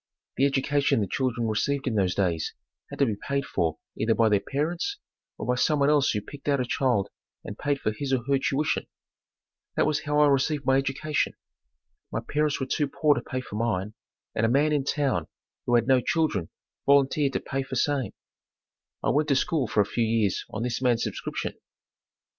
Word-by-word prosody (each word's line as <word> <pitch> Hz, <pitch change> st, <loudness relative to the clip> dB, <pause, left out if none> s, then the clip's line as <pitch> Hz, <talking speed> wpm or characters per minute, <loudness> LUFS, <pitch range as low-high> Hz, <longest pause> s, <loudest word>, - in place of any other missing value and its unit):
The 135 Hz, -, +4 dB
education 140 Hz, -1 st, +1 dB
the 105 Hz, -, +1 dB
children 120 Hz, +2 st, -1 dB
received 135 Hz, +6 st, 0 dB
in 125 Hz, -, 0 dB
those 95 Hz, -4 st, +1 dB
days 85 Hz, -5 st, 0 dB, 0.3 s
had -, -, -8 dB
to 140 Hz, -, +4 dB
be 110 Hz, -5 st, -1 dB
paid 140 Hz, +5 st, -2 dB
for 80 Hz, -, -1 dB, 0.2 s
either 110 Hz, +1 st, +1 dB
by 115 Hz, -1 st, +4 dB
their 105 Hz, -1 st, +4 dB
parents 165 Hz, -, -2 dB, 0.4 s
or -, -, -5 dB
by 125 Hz, -, +2 dB
someone 140 Hz, +3 st, +3 dB
else 145 Hz, -2 st, +3 dB
who 105 Hz, -, 0 dB
picked 140 Hz, +7 st, -12 dB
out 140 Hz, -2 st, +2 dB
a 125 Hz, -, 0 dB
child 120 Hz, -6 st, +1 dB, 0.3 s
and 105 Hz, -, -7 dB
paid 145 Hz, +3 st, -1 dB
for 110 Hz, -, 0 dB
his 135 Hz, +5 st, -4 dB
or 130 Hz, -3 st, +1 dB
her 140 Hz, -1 st, +3 dB
tuition. 140 Hz, +3 st, 0 dB, 0.9 s
That -, -, +3 dB
was 150 Hz, 0 st, 0 dB
how 150 Hz, 0 st, 0 dB
I 150 Hz, -, +7 dB
received 140 Hz, +1 st, +1 dB
my 135 Hz, 0 st, +4 dB
education. 135 Hz, +2 st, 0 dB, 0.8 s
My -, -, -1 dB
parents 150 Hz, 0 st, 0 dB
were 135 Hz, -, -1 dB
too 145 Hz, +2 st, 0 dB
poor 150 Hz, +2 st, +3 dB
to -, -, -3 dB
pay 130 Hz, -, -4 dB
for 105 Hz, -4 st, -7 dB
mine, 105 Hz, -3 st, -1 dB, 0.4 s
and -, -, -1 dB
a 115 Hz, -, +4 dB
man 145 Hz, +5 st, +3 dB
in 140 Hz, -2 st, +1 dB
town, 135 Hz, -, 0 dB, 0.4 s
who 120 Hz, -, +3 dB
had 115 Hz, -1 st, +4 dB
no 130 Hz, -1 st, +4 dB
children 135 Hz, -, 0 dB, 0.4 s
volunteered 140 Hz, 0 st, +4 dB
to -, -, 0 dB
pay 135 Hz, 0 st, -3 dB
for 135 Hz, 0 st, -5 dB
same. 135 Hz, -4 st, 0 dB, 0.9 s
I -, -, +2 dB
went 150 Hz, +1 st, +2 dB
to 140 Hz, -, +3 dB
school 140 Hz, -1 st, +1 dB
for 105 Hz, -, +2 dB
a -, -, +2 dB
few 115 Hz, +3 st, -1 dB
years 110 Hz, -3 st, +1 dB
on 110 Hz, -, -4 dB
this 125 Hz, 0 st, -2 dB
man's 120 Hz, -3 st, +2 dB
subscription. -, -, -3 dB
135 Hz, 200 wpm, -26 LUFS, 115-145 Hz, 0.9 s, I